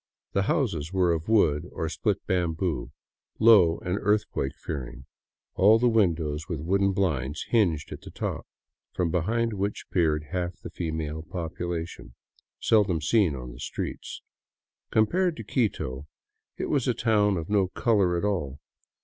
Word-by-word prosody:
The 100 - +2
houses 85 - 0
were 90 -3 +2
of 80 +4 -4
wood 80 -10 +3
or - - -3
split - - -1
bamboo, 85 -5 -1 0.5
low 100 -7 +6
and 90 +3 -1
earthquake 100 -9 0
fearing, 65 -3 -6 0.5
all 105 +4 +6
the 120 +2 +2
windows 80 -9 +1
with 85 -4 -3
wooden 100 +5 +2
blinds 80 -7 -1
hinged 85 -10 +1
at - - -7
the - - -10
top, - - -4 0.5
from 85 -3 0
behind 115 +6 0
which 100 +1 -3
peered 80 -4 +2
half 90 -1 -3
the - - -8
female 80 -2 -3
population, 80 -5 -5 0.4
seldom 100 -7 +3
seen 90 -1 +2
on 60 -1 -7
the - - -12
streets. - - -5 0.7
Compared 170 - +2
to 115 - -6
Quito, 75 - -2 0.5
it - - -2
was 135 -4 +1
a 125 - +2
town 105 -4 +2
of 80 -1 -4
no 100 -2 +2
color 95 -3 +2
at 85 - -1
all. 80 -9 -2
90 Hz, 150 wpm, -27 LUFS, 80-105 Hz, 0.7 s, low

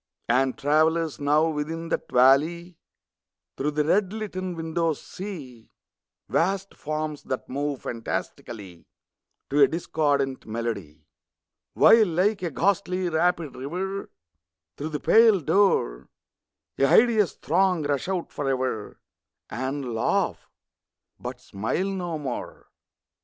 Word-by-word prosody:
And 130 +3 +2
travellers, 155 +2 +2
now, 150 +2 +3
within 160 +2 -4
that - - -2
valley, 155 +8 +3 0.8
Through 145 - -1
the 150 0 0
red 190 +4 +2
litten 185 -4 -4
windows 165 -1 -1
see 145 - -9 0.6
Vast 195 +3 0
forms, 155 0 -4
that 130 - -4
move 140 0 -3
fantastically 105 -5 -6 0.6
To 145 +1 +3
a 140 - +8
discordant 145 -6 -1
melody, 100 -10 -5 0.7
While, 225 -2 +7
like 185 +5 +1
a 175 - -1
ghastly 185 +2 0
rapid 165 -2 0
river, 185 +9 -4 0.7
Through 150 - -5
the 150 -2 -3
pale 225 +1 +5
door 155 - +1 0.7
A 135 - +5
hideous 220 - +4
throng 180 0 +1
rush 145 +1 -1
out 185 -3 -2
forever 130 -6 -2 0.5
And 130 0 -3
laugh 115 - 0 0.7
but 125 0 -6
smile 125 - -2
no 175 -4 -3
more. 135 -5 -6
155 Hz, 110 wpm, -25 LUFS, 135-180 Hz, 0.8 s, a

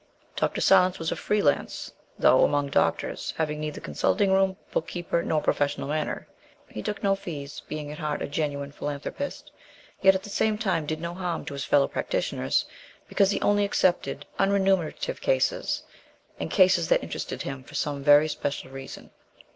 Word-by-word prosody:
Dr. - - 0
Silence 185 -1 +5
was 165 -1 -2
a - - 0
free 210 -1 0
lance, 145 - 0 0.2
though, - - +5
among 145 -1 +2
doctors, - - 0
having 150 -1 -1
neither 150 -1 -4
consulting 200 -2 +1
room, 190 -1 +2
book 160 - -1
keeper, 175 -1 -1
nor 155 -2 0
professional 145 -1 0
manner. 155 0 -2 0.4
He 105 - -7
took 210 - -4
no 195 -1 +4
fees, 145 -7 -7
being 150 -1 -5
at 150 - -8
heart 150 -1 -2
a - - -2
genuine 145 -1 -2
philanthropist, 145 - -5 0.5
yet 190 -1 +6
at 190 - -2
the 205 - -9
same 215 +1 +1
time 185 -8 0
did 155 0 -2
no 170 0 -4
harm 175 -2 -3
to - - -6
his 140 -1 -4
fellow 140 -1 +4
practitioners, - - -1 0.4
because 195 -2 +3
he 200 - 0
only 205 0 +3
accepted 185 -3 +1
unremunerative 195 - +1
cases, - - +1 0.6
and - - -3
cases 185 -4 +4
that - - +3
interested - - -5
him 135 -1 -5
for 130 - -13
some 145 -2 -2
very 145 +1 +7
special 145 -3 -4
reason. 135 0 -9
160 Hz, 170 wpm, -26 LUFS, 145-195 Hz, 0.6 s, very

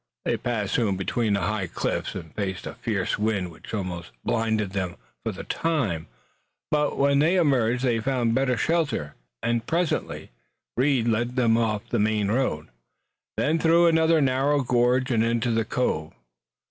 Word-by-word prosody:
They - - +1
passed 110 -5 -2
soon 105 -6 +1
between 105 +2 0
high 100 -1 -1
cliffs, - - -3
and 85 -5 -8
faced 95 -3 -3
a - - -5
fierce - - -2
wind 105 -5 0
which 80 - -12
almost 90 -5 -4
blinded 110 -3 0
them 95 -3 -3 0.3
for - - -1
the - - -8
time, 125 - -1 0.6
but, 150 -1 +1
when 140 0 +3
they 160 +5 +3
emerged 130 -8 +2
they 120 -3 +2
found 120 -1 0
better 130 -1 +1
shelter 155 - 0 0.3
and, 120 -1 0
presently, 170 0 -1 0.4
Reed 130 -2 +2
led 120 +2 0
them 115 -3 +3
off 110 -3 0
the 120 - 0
main 105 -1 +1
road, 110 - -1 0.7
then 160 +2 +1
through 170 +1 +5
another 160 -1 +4
narrow 135 +2 +2
gorge 125 +2 +2
and 115 -2 +3
into 115 +1 +1
the 115 -1 +1
cove. 80 -12 -1
120 Hz, 160 wpm, -25 LUFS, 105-135 Hz, 0.7 s, through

